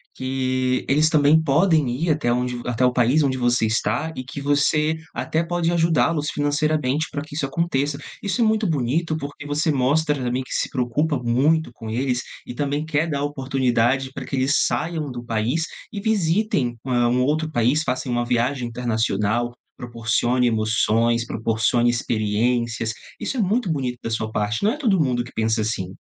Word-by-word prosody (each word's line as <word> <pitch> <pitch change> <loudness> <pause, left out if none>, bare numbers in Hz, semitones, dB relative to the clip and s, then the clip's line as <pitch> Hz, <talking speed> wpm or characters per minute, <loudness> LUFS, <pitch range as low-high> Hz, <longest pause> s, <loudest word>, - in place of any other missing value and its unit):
que 130 -1 -1
eles 150 +3 +3
também 155 0 +4
podem 155 -1 +3
ir 150 +8 0
até 145 -6 +1
onde 125 0 -1
até 125 +1 +1
o 125 - +2
país 125 +5 +3
onde 130 -2 0
você 120 -2 +2
está 110 +7 0
e 130 - -5
que 135 +2 -7
você 150 +2 +2 0.2
até 160 +1 -1
pode 170 0 0
ajudá-los 160 -2 +2
financeiramente 150 0 0
pra 145 - -3
que 155 -1 -13
isso 145 - -1
aconteça. 145 -2 -1 0.2
Isso 205 +4 -1
é - - +5
muito 220 -1 +2
bonito, 155 +3 0
porque 145 -1 -7
você 150 +2 +1
mostra, 150 +3 +2
também, 125 -1 -2
que - - -8
se - - -1
preocupa 140 +4 0
muito 130 +5 +1
com 110 -1 -8
eles 125 +2 -1 0.2
e - - -7
também 145 +3 -2
quer 160 +1 0
dar 145 -2 -1
a - - -1
oportunidade 130 -2 0
pra - - -6
que - - -4
eles 135 +2 +2
saiam 160 -3 -2
do 120 -1 -6
país 120 +7 -1 0.3
e 205 - -5
visitem, 195 - +1
hã, 120 -2 +2
um 125 +1 +2
outro 155 +3 0
país, 125 +4 +2
façam 130 -2 -2
uma 120 0 0
viagem 120 +1 0
internacional, 115 -1 -1 0.2
proporcione 120 +1 0
emoções, 115 +1 +1
proporcione 115 +1 +1
experiências. 115 0 0 0.3
Isso 270 - -3
é - - -1
muito 210 -1 +1
bonito 130 -5 -2
da - - -3
sua 110 -1 -2
parte. 105 +1 -1
Não 210 - +4
é - - -6
todo 220 - +2
mundo 125 -5 +1
que 125 - -12
pensa 110 0 0
assim. 95 -4 -3
130 Hz, 180 wpm, -22 LUFS, 120-155 Hz, 0.3 s, é